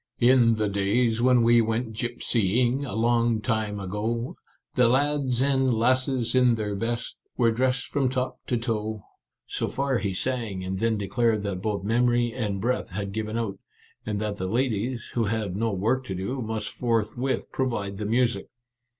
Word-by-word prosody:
" - - -62 0.2
In 115 -3 +5
the 110 -1 0
days 110 +4 +1
when 125 -1 +5
we 120 0 +6
went 115 +1 -1
gypsying, 120 +2 +1
A 100 - -5
long 115 0 +2
time 110 -2 -1
ago, 115 - -3 0.4
The 125 -2 +4
lads 135 -1 +2
and 135 -2 +2
lasses 125 +1 +1
in 125 -2 +4
their 105 -2 -2
best 115 +3 -3 0.2
Were 115 -2 +4
dressed 125 +2 0
from 135 -3 0
top 130 0 -2
to 125 - +1
toe 110 -3 -3
— - - -56
" - - -63
So - - -2
far 135 -2 0
he 100 -1 -2
sang, 115 -5 -2
and 95 +1 -3
then 115 0 +1
declared 110 +1 +1
that 95 -3 -3
both 100 -1 -2
memory 120 +2 +2
and 105 -6 -2
breath 125 +5 -1
had 100 +1 -4
given 110 +1 -3
out, 115 -4 -3 0.4
and 105 -2 -2
that 105 -1 -2
the 95 - -3
ladies, 120 +1 -1
who 115 -2 +1
had 105 -3 -2
no 115 +2 0
work 110 +7 0
to 95 - -4
do, 110 +9 -3
must 110 -1 -3
forth 115 -3 -1
with 130 +2 -2
provide 105 -7 -2
the 105 0 -3
music. 120 +2 +1
115 Hz, 185 wpm, -26 LUFS, 105-125 Hz, 0.4 s, we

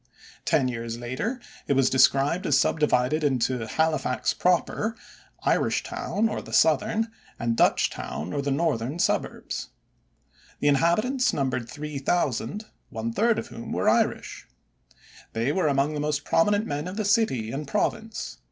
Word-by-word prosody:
Ten 130 - +2
years 115 -1 -4
later 130 - -3 0.3
it - - +2
was 135 -1 +3
described 140 +7 +3
as 140 -2 +4
divided 150 0 +2
into 125 -4 0
Halifax 155 -2 0
proper, 185 +5 +1 0.5
Irishtown 220 +2 0
or - - -3
the - - -11
southern, 210 - +3 0.3
and 115 0 -1
Dutchtown 85 -6 0
or 140 - -1
the 140 - -2
northern, 140 -2 0
suburbs. - - -1 0.9
The 145 - +3
inhabitants 215 - +2
numbered 130 -4 -1
3,000, 145 - -2 0.2
one 115 +1 -4
third 230 - +2
of - - -4
whom 115 - -7
were - - 0
Irish. - - +1 0.9
They 115 +5 0
were 185 -1 +1
among 140 +1 +1
the 150 - -3
most 150 -1 -1
prominent 205 +5 +2
men 145 0 -3
of 185 +3 -6
the 215 - -1
city 135 - +1
and 145 +2 -4
province. 215 +4 -2
145 Hz, 140 wpm, -26 LUFS, 125-180 Hz, 0.9 s, as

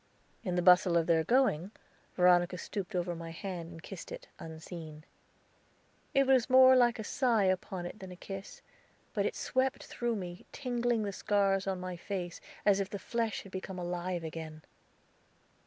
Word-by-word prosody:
In 180 -5 -1
the 180 - +1
bustle 180 0 +6
of 165 - +2
their 165 -1 +3
going, 235 - +2 0.5
Veronica 180 0 +4
stooped 195 +2 -5
over 175 0 0
my 165 0 -7
hand 170 0 -6
and 165 -1 -11
kissed - - -8
it, - - -8
unseen. 160 -1 -8 1.1
It 275 0 +5
was 260 -2 +4
more 260 0 +8
like 245 -1 +4
a 220 - -4
sigh 235 -2 +2
upon 185 -1 -1
it 175 - -7
than 190 -2 -8
a - - -8
kiss, 195 +2 -8 0.5
but - - +1
it - - -4
swept 260 0 0
through 240 -1 -2
me, 180 -3 -7
tingling 240 -4 0
the 200 -1 -3
scars 195 -1 +1
on 190 -1 -1
my 180 -1 -5
face, 175 -2 -5 0.2
as 200 -1 +5
if 195 -1 -1
the 200 - -4
flesh 230 +1 -2
had 195 - -13
become 190 0 -6
alive 175 0 -3
again. 155 -1 -7
190 Hz, 170 wpm, -32 LUFS, 175-225 Hz, 1.1 s, more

